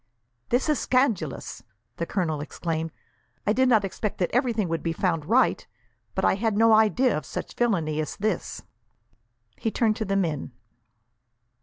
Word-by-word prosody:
"This 245 +5 +1
is 300 -2 +2
scandalous!" 225 - 0 0.4
the 170 - -3
colonel 160 -7 -1
exclaimed. 160 +1 -3 0.5
"I 210 - +3
did 260 +2 +3
not 220 -5 +4
expect 200 +2 -3
that 180 - 0
everything 235 -5 +1
would 165 0 -2
be 165 - -1
found 165 -4 0
right, 245 +6 +2 0.5
but - - +1
I - - +4
had 210 +1 0
no 225 0 +6
idea 220 +4 +4
of 155 - -3
such - - -6
villainy 170 -11 0
as 155 - -4
this!" 210 -2 -2 0.9
He 225 - -1
turned 220 -1 +1
to 220 - -2
the 195 0 -1
men. 160 -9 -1
200 Hz, 160 wpm, -26 LUFS, 165-230 Hz, 0.9 s, no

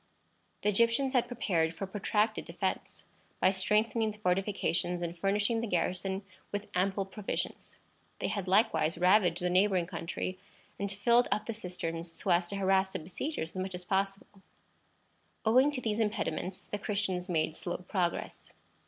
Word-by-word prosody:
The 210 - +3
Egyptians 235 +6 +2
had 245 -2 +3
prepared 170 -9 0
for 195 - -5
a - - -2
protracted 210 +2 0
defence, - - -4 0.3
by 185 - +5
strengthening 215 +3 +2
the 210 - -7
fortifications 180 -2 0
and 170 0 -3
furnishing 205 +5 +1
the 230 - -2
garrison 185 +2 -1 0.3
with 205 0 -4
ample 190 +2 +1
provisions. 195 +1 -4 0.4
They - - -2
had 200 -3 -3
likewise 180 -6 +3
ravaged 180 -1 +4
the 180 - +2
neighboring 185 -1 +3
country, 180 +1 -4 0.4
and 200 0 -1
filled 235 +5 +4
up 210 - 0
the 230 - -3
cisterns 170 -4 -5
so 185 - -2
as 175 0 +3
to 200 - -3
harass 190 0 +2
the - - -1
besiegers 175 - -4
as 185 - -1
much 190 -1 -4
as 180 0 -8
possible. 195 +1 -2 1.0
Owing 255 +6 +6
to 285 -3 -3
these 220 -2 -1
impediments 210 -3 -2
the 205 - -4
Christians 200 -3 -1
made 160 -2 +1
slow 175 - -3
progress. 180 -2 -2
195 Hz, 160 wpm, -31 LUFS, 180-210 Hz, 1.0 s, Owing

